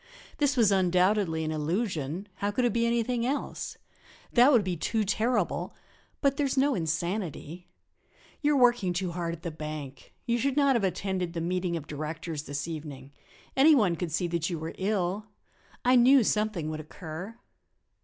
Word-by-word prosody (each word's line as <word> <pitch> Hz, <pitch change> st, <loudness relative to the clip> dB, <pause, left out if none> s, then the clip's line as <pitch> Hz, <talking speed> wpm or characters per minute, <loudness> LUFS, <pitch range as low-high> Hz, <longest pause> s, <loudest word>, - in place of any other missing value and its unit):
This 285 Hz, -2 st, +2 dB
was 220 Hz, -4 st, +5 dB
undoubtedly 185 Hz, -2 st, +2 dB
an 155 Hz, -, -2 dB
illusion 165 Hz, -, -2 dB
how 205 Hz, 0 st, -1 dB
should 245 Hz, +4 st, +1 dB
it 240 Hz, -, +1 dB
be 235 Hz, 0 st, +2 dB
anything 235 Hz, 0 st, 0 dB
else? 275 Hz, +4 st, -3 dB, 0.6 s
That 250 Hz, +4 st, +7 dB
would 240 Hz, -6 st, +5 dB
be 185 Hz, -2 st, -2 dB
too 215 Hz, +7 st, 0 dB
terrible! 215 Hz, 0 st, 0 dB, 0.5 s
But 275 Hz, -1 st, +2 dB
there 290 Hz, -, +1 dB
is 270 Hz, -, -3 dB
no 280 Hz, +2 st, +3 dB
insanity; 170 Hz, -, -3 dB, 0.7 s
you 295 Hz, -1 st, +3 dB
are -, -, +3 dB
working 240 Hz, -7 st, +4 dB
too 180 Hz, 0 st, -2 dB
hard 170 Hz, -1 st, -3 dB
at 165 Hz, -, -18 dB
the 170 Hz, -, -3 dB
bank. 150 Hz, -3 st, -8 dB
You 235 Hz, 0 st, +1 dB
should 275 Hz, +3 st, 0 dB
not 280 Hz, -2 st, +4 dB
have 230 Hz, -, +1 dB
attended 185 Hz, -1 st, -1 dB
the 170 Hz, -, -3 dB
meeting 175 Hz, 0 st, -1 dB
of 155 Hz, -, -7 dB
directors 155 Hz, +1 st, -5 dB
this 145 Hz, +2 st, -4 dB
evening; 145 Hz, -4 st, -7 dB, 0.4 s
any 295 Hz, +3 st, +7 dB
one 200 Hz, -10 st, +3 dB
could 170 Hz, -1 st, -4 dB
see 175 Hz, +3 st, 0 dB
that 170 Hz, 0 st, -1 dB
you 170 Hz, -, -2 dB
were 160 Hz, +1 st, -5 dB
ill; 195 Hz, +1 st, -1 dB, 0.6 s
I 250 Hz, +1 st, +5 dB
knew 255 Hz, +1 st, +6 dB
something 210 Hz, -7 st, 0 dB
would 155 Hz, -, -5 dB
occur." 165 Hz, +6 st, -8 dB
185 Hz, 175 wpm, -28 LUFS, 160-235 Hz, 0.7 s, That